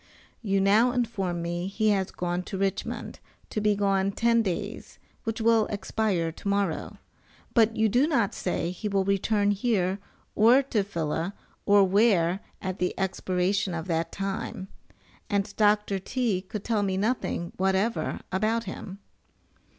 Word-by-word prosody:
You 195 -3 +1
now 210 +5 +4
inform 195 -9 -1
me 175 +1 -2
he 215 +2 +1
has 195 -2 +1
gone 175 0 -2
to 195 - -4
Richmond, 195 0 -3 0.3
to 215 - -1
be 210 0 +3
gone 195 -1 +1
ten 230 +1 +3
days, 185 -6 -4 0.3
which 225 0 -2
will 225 -1 +3
expire 200 -5 -1
tomorrow, 200 0 -2 0.6
but 225 -1 +4
you 220 0 +4
do 245 +7 +3
not 275 - +1
say 175 -1 -2
he 185 +4 -5
will 195 -1 +1
return 205 +1 +2
here 200 -3 0 0.3
or 240 +6 +5
to 225 -6 0
Phila, 170 0 -3 0.3
or 200 -1 +6
where, 190 -3 +3 0.2
at 185 -1 -3
the 180 - 0
expiration 185 0 0
of 165 0 -4
that 165 0 0
time, 195 -1 -4 0.6
and 205 0 -1
Dr. 210 -2 +2
T. 220 -2 -1
could 195 +2 -7
tell 220 -3 0
me 190 -2 0
nothing 200 -5 -1
whatever 190 +4 0
about 215 +5 +1
him. 195 -1 -7
200 Hz, 145 wpm, -27 LUFS, 185-215 Hz, 0.6 s, or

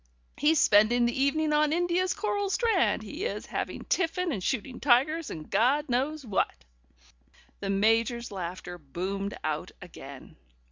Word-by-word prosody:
He's 300 +2 +3
spending 220 +4 +5
the 240 - 0
evening 300 +3 +1
on 300 0 +3
India's 350 +2 +1
coral 405 -1 -1
strand, 410 - +1
he 295 - -6
is, 475 - -3
having - - -4
tiffin 360 0 0
and 200 -9 -3
shooting 250 +3 -2
tigers 290 +5 +2
and 155 -1 -7
Gawd 280 +5 +2
knows 275 +4 -1
what 130 - -1 0.5
'" - - -31
The 195 - -4
Major's 225 +4 +1
laughter 180 -1 -6
boomed 190 +7 -4
out 155 -1 -2
again. - - -11
250 Hz, 145 wpm, -28 LUFS, 200-315 Hz, 0.5 s, spending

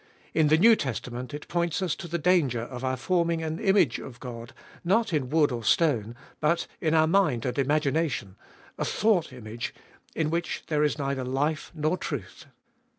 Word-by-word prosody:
In 160 -2 +4
the 155 +1 +5
New 225 +6 +7
Testament 125 - -4
it 145 +1 -7
points 170 -1 0
us 185 -4 0
to - - -7
the 170 +1 -2
danger 155 -8 +2
of 125 +1 -7
our 130 0 0
forming 170 +2 0
an 160 0 -3
image 195 - +3
of 125 -2 -10
God, 120 -1 -8 0.3
not 200 +3 +2
in 135 -5 0
wood 150 -1 +3
or 120 -2 -4
stone, 120 -7 +2 0.2
but 165 +3 +1
in 160 0 +1
our 160 0 +5
mind 160 -9 +2
and 125 +2 -2
imagination 145 - 0 0.2
— - - -24
athought 210 -9 +1
image, 115 -2 -6 0.4
in 155 -1 0
which 170 +1 -2
there 150 -1 +2
is 150 0 +1
neither 140 -2 -2
life 145 +5 -1
nor 155 +3 0
truth. 120 - -6
150 Hz, 180 wpm, -27 LUFS, 130-170 Hz, 0.4 s, New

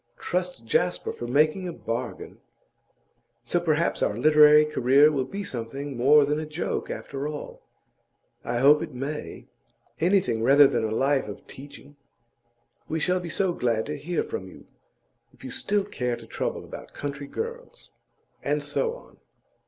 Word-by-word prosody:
Trust 180 -9 -3
Jasper 180 +10 0
for 120 - -6
making 155 +8 +2
a - - -3
bargain! 120 -4 -5 1.0
So 145 +9 0
perhaps 165 -1 0
our 105 - +1
literary 150 +3 +6
career 145 0 +4
will 135 -3 -1
be 200 +9 -5
something 135 0 -6
more 140 +4 +5
than 150 +2 0
a 155 - -4
joke, 155 +3 -3
after 140 +1 -5
all. 150 -1 -7 0.8
I 120 - -2
hope 145 +4 +6
it 155 -5 -6
may; 140 +4 -5 0.5
anything 165 - +2
rather 140 +5 +7
than 135 - +1
a 110 - 0
life 135 +4 +1
of 105 - -9
teaching. 145 +1 -13 0.9
We 160 - -1
shall 180 +3 +1
be 175 -1 -6
so 185 +2 0
glad 115 -6 0
to 150 - -4
hear 160 +5 -2
from 455 - -6
you, - - -14 0.7
if - - -20
you 265 - -7
still 210 -7 0
care 125 -11 -3
to - - -12
trouble - - -3
about - - -10
country 140 0 -5
girls.' 480 - -7 0.5
And - - -1
so 470 -1 -1
on. - - -16
150 Hz, 160 wpm, -26 LUFS, 130-175 Hz, 1.0 s, rather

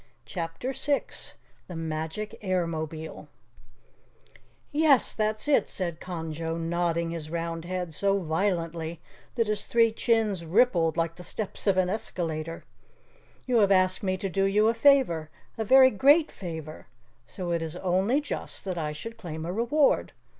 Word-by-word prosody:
CHAPTER 165 - -4
6 285 +1 -2 0.3
The 180 - -8
Magic 160 +5 -4
Airmobile 160 -5 -3 1.4
"Yes, 295 -4 +4
that's 215 +3 -1
it," 280 -8 +3
said 170 -4 -2
Conjo, 165 -2 -4
nodding 170 0 -1
his 160 -2 -5
round 165 0 -3
head 180 -2 -4
so 200 +4 +2
violently 165 -2 -2 0.4
that 230 -2 +2
his 210 -1 0
three 230 -1 +3
chins 220 -5 +1
rippled 170 -3 +3
like 165 0 -1
the 180 - -9
steps 210 +2 -3
of 195 -2 +4
an 185 -1 +3
escalator. 165 -5 -3 0.8
"You 250 -2 +2
have 200 -3 +4
asked 185 -1 +3
me 185 -2 0
to 195 - -3
do 195 +1 +1
you 210 +3 +3
a - - +2
favor 230 - +3 0.3
a 225 - -2
very 260 +3 +7
great 285 - +4
favor 160 -4 -7 0.4
so 180 -3 -5
it 170 -1 0
is 160 0 -4
only 190 +9 +1
just 290 - -4
that 185 -3 -2
I 150 -1 -2
should 230 +9 -8
claim 160 -5 -6
a 175 - -3
reward. 245 +7 +2
180 Hz, 150 wpm, -27 LUFS, 165-220 Hz, 1.4 s, very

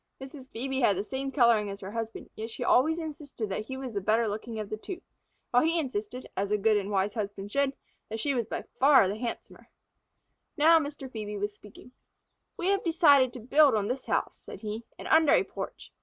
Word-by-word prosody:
Mrs. 265 0 -10
Phœbe 265 +3 -3
had 205 -7 +3
the 195 - -1
same 270 +4 -4
coloring 235 -6 +4
as 200 0 -7
her 195 +1 -7
husband, 225 0 -5
yet 220 +1 -5
she 240 - -5
always 310 +7 +4
insisted 295 -9 -5
that 215 +3 -4
he 265 - -5
was 260 -3 -6
the 200 - -2
better 220 +4 +2
looking 220 +2 -5
of 210 -1 -6
the - - -1
two, 345 - -7 0.5
while 245 - +5
he 330 +3 +2
insisted, 250 -3 -4
as 195 +1 -1
a 210 - +2
good 215 +1 +3
and 200 -1 -1
wise 200 0 0
husband 205 -2 -5
should, 280 +1 +1 0.3
that 220 +1 -4
she 280 +5 0
was 235 -4 -1
by - - -4 0.2
far 265 -6 +6
the 200 +3 -3
handsomer. 235 0 -6 0.9
Now 325 +2 +6
Mr. 285 -2 -5
Phœbe 210 -4 -5
was 205 +1 -2
speaking. 210 +4 -15 0.7
"We 355 - 0
have 395 0 +2
decided 290 -7 +5
to 250 - -7
build 280 +3 +5
on 210 0 0
this 255 +1 -4
house," - - -1
said - - -11
he, 220 +1 -5
"and - - -8
under 315 -2 +5
a - - +5
porch. - - -8
235 Hz, 215 wpm, -28 LUFS, 210-275 Hz, 0.9 s, far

